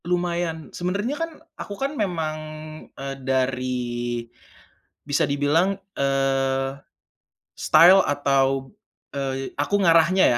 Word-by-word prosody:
Lumayan, 175 -2 -2
sebenarnya 200 +8 -2
kan 330 +2 -3 0.2
aku 200 - -7
kan 275 +2 -2
memang, 170 - -2 0.6
eee, 135 0 -5
dari 130 -1 0 1.2
bisa 145 0 +1
dibilang, 145 +7 +2 0.2
eee, 135 0 0 0.8
style 180 +3 +7
atau, 135 -2 +1 0.4
eee 135 -1 -3
aku 145 +8 -1
ngarahnya 170 +2 +5
145 Hz, 95 wpm, -24 LUFS, 135-175 Hz, 1.2 s, style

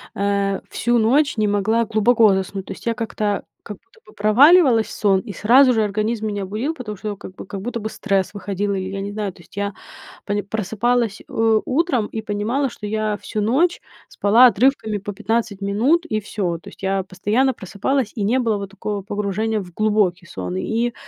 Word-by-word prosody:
э, 200 -1 0
всю 240 +1 +1
ночь 260 +4 +2
не 215 -1 +2
могла 215 +3 +1
глубоко 220 0 +4
заснуть, 190 0 -3
то - - -6
есть - - -14
я 230 - +1
как-то, 215 -3 -2 0.2
как 210 -3 -8
будто 385 - -27
бы - - -17
проваливалась 240 - +5
в - - -10
сон, 195 -3 +2
и 215 - -8
сразу 250 +7 +5
же 220 - +2
организм 215 +2 -1
меня 205 -2 -3
будил, 220 +11 -2
потому 215 -8 -7
что, 210 0 -4
как 185 -1 -11
бы, - - -9
как 195 0 -7
будто 235 +2 -4
бы 220 0 -4
стресс 195 -3 -1
выходил, 200 0 -2
и 190 - -2
я 195 0 -5
не 200 +1 -4
знаю, 205 -2 -3
то 175 - -18
есть 170 - -19
я 200 0 -2 0.5
пони 205 0 -1
просыпалась, 220 +2 -1
э, 225 -1 +2
утром 265 -6 +1
и 220 +1 -5
понимала, 220 +7 -1
что 210 - -8
я 215 0 -1
всю 215 - -5
ночь 275 +12 +2 0.3
спала 225 +5 +5
отрывками 235 -3 +2
по 205 +1 -6
15 220 0 -2
минут, 245 - +1
и 215 -6 -1
всё. 190 -4 -3
То - - -14
есть - - -15
я 195 0 0
постоянно 210 +8 0
просыпалась, 215 +5 -2
и 215 - -3
не 230 +6 +2
было 230 -4 +1
вот 200 -1 -6
такого 205 0 -4
погружения 210 +2 -2
в 180 -2 -10
глубокий 205 -5 +1
сон, 90 - -5
и, 230 - -1
210 Hz, 200 wpm, -21 LUFS, 200-235 Hz, 0.5 s, проваливалась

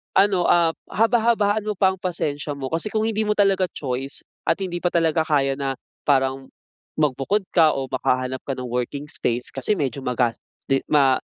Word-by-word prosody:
ano, 195 -2 +4
ap 170 -2 +3
haba-habaan 220 -2 +2
mo 210 - -1
pa 190 0 +3
ang 190 - -8
pasensya 150 -5 -3
mo, 135 -1 -5
kasi 165 +6 0
kung 215 0 -1
hindi 220 -1 0
mo 210 - +1
talaga 195 -2 +3
choice 135 0 -3 0.2
at - - +4
hindi 175 -2 -3
pa 175 - 0
talaga 160 -2 +1
kaya 135 -3 +1
na, 135 -1 -1 0.3
parang 135 -1 +1 0.5
magbukod 150 +7 +1
ka 160 -3 +4
o 135 -1 -4
makahanap 130 +1 0
ka 135 - -1
ng 130 - -6
working 125 +3 -2
space 120 +1 -1
kasi 135 +10 0
medyo 140 -5 -2
magas 125 -2 0 0.3
din, 135 - +4
ma 135 -3 +4
155 Hz, 180 wpm, -23 LUFS, 135-195 Hz, 0.5 s, ano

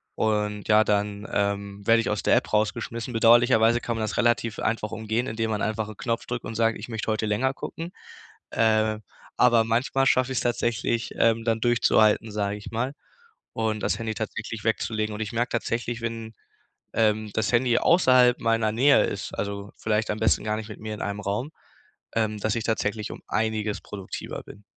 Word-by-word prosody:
und 105 -1 -1
ja, 110 0 +6
dann, 105 0 -1
ähm, 100 0 -2
werd 115 0 +6
ich - - -2
aus - - -1
der - - +4
App - - 0
rausgeschmissen. 115 +3 -1
Bedauerlicherweise 115 0 +5
kann 120 -1 -3
man 115 - -3
das 110 - -3
relativ 120 -2 +1
einfach 110 -1 -1
umgehen, 110 +2 -2
indem 110 0 -2
man 105 -1 -1
einfach 110 0 -1
'n 110 - -9
Knopf 115 +2 -2
drückt 120 -1 -4
und 115 - -6
sagt: 115 +1 +2
„Ich - - -9
möchte 110 -1 -3
heute 110 0 -1
länger 125 +6 +1
gucken“, 165 +4 -7 0.6
äh, 110 -1 +2 0.4
aber 120 -2 +5
manchmal 120 +4 +1
schaff 130 0 +3
ich's 130 - -1
tatsächlich, 120 -1 -1
ähm, 115 0 +2
dann 115 -1 +1
durchzuhalten, 110 -2 +3
sag 100 -1 -1
ich 105 - -9
mal, 120 +4 -2 0.6
und 110 -1 -1
das - - 0
Handy 110 -1 -2
tatsächlich 110 0 -5
wegzulegen. 110 -1 -1
Und 105 - -5
ich 105 - -3
merk 120 +2 0
tatsächlich, 120 0 -2
wenn, 115 -1 -5 0.6
ähm, 110 -1 +1
das 110 -1 0
Handy 120 0 +3
außerhalb 130 -7 +5
meiner 115 -1 +2
Nähe 135 +5 +5
ist, - - -5
also 100 0 -4
vielleicht 110 0 0
am 105 - -3
besten 110 - +2
gar 105 0 0
nicht 110 -1 -6
mit 110 - -9
mir 110 0 -5
in - - -9
einem 100 0 -3
Raum, 105 +9 -2 0.6
ähm, 110 -2 0
dass 110 +2 0
ich 115 - -2
tatsächlich 110 -1 -1
um - - -9
einiges 110 -1 -1
produktiver 100 -2 -7
bin. 105 - -14
110 Hz, 190 wpm, -25 LUFS, 105-115 Hz, 0.6 s, ja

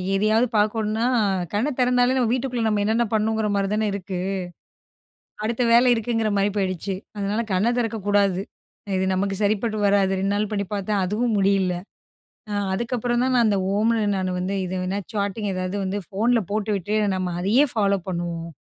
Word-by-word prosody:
எதையாவது 215 +4 +3
பார்க்கணும்னா 215 +2 +1 0.5
கண்ண 225 +8 +1
தெறந்தாலே 250 0 +3
நம்ம 245 -3 +2
வீட்டுக்குள்ள 250 -2 -1
நம்ம 210 -1 +1
என்னென்ன 225 +3 +2
பண்ணணுங்ற 220 0 +1
மாரி 195 0 +1
தான 215 0 +1
இருக்கு. 190 -2 -4 1.2
அடுத்த 235 +3 0
வேலை 240 +2 +6
இருக்குங்கற 225 -1 0
மாரி 200 +1 +2
போயிடுச்சு. 190 -1 -1 0.2
அதனால 205 +3 -1
கண்ண 190 +5 +2
தெறக்கக்கூடாது. 205 -4 +1 0.6
இது 190 0 +1
நமக்கு 195 +1 0
சரிப்பட்டு 215 +1 0
வராது 195 -1 +3
2 195 +1 0
நாள் 210 0 -1
பண்ணி 200 -1 -1
பார்த்தேன், 200 0 -1
அதுவும் 220 +4 0
முடியல. 195 -2 +2 0.8
அ - - -2 0.2
அதுக்கப்புறம் 240 +2 -1
தான் 260 0 +1
நான் 235 -2 +4
அந்த 205 -2 +2 0.2
ஓம்னு 225 +1 +2
நான் 185 -1 -1
வந்து 185 +2 -2
இது 185 - -4
வேணா 190 +2 -2
சாட்டிங் 205 0 -2
ஏதாவது 185 +1 -3
வந்து 190 +2 -2
ஃபோன்ல 230 +4 +2
போட்டுவிட்டு 210 -1 -1 0.2
நம்ம 180 -2 -2
அதையே 230 +10 +4
ஃபாலோ 200 -3 +2
பண்ணுவோம். 170 -1 -4
210 Hz, 160 wpm, -23 LUFS, 195-225 Hz, 1.2 s, வேலை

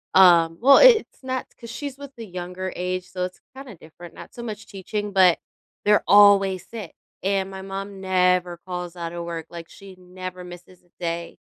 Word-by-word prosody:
Um 170 -3 +6
well, 275 +2 +7
i - - +7
it's 455 - +4
not 260 0 -3
'cause 235 -2 -10
she's 285 -2 -6
with 280 -1 -10
the 225 - -7
younger 180 0 -6
age, 180 0 -3
so 180 0 -3
it's 185 - -10
kinda 265 -6 -10
different, 165 +2 -14
not - - -12
so 235 - -8
much 215 -1 -7
teaching, 205 +1 -5
but 185 -3 +5 0.5
they're 210 0 +4
always 200 -2 +5
sick 220 -7 -8 0.3
and 195 0 -1
my 190 0 -8
mom 195 +1 -7
never 180 -2 +1
calls 180 -1 -6
outta 170 0 -6
work, 165 -1 -6
like, 170 -1 -9
she 195 -1 -14
never 185 0 -9
misses 180 +1 -13
a 175 - -32
day. 170 -1 -4
185 Hz, 190 wpm, -23 LUFS, 175-205 Hz, 0.5 s, well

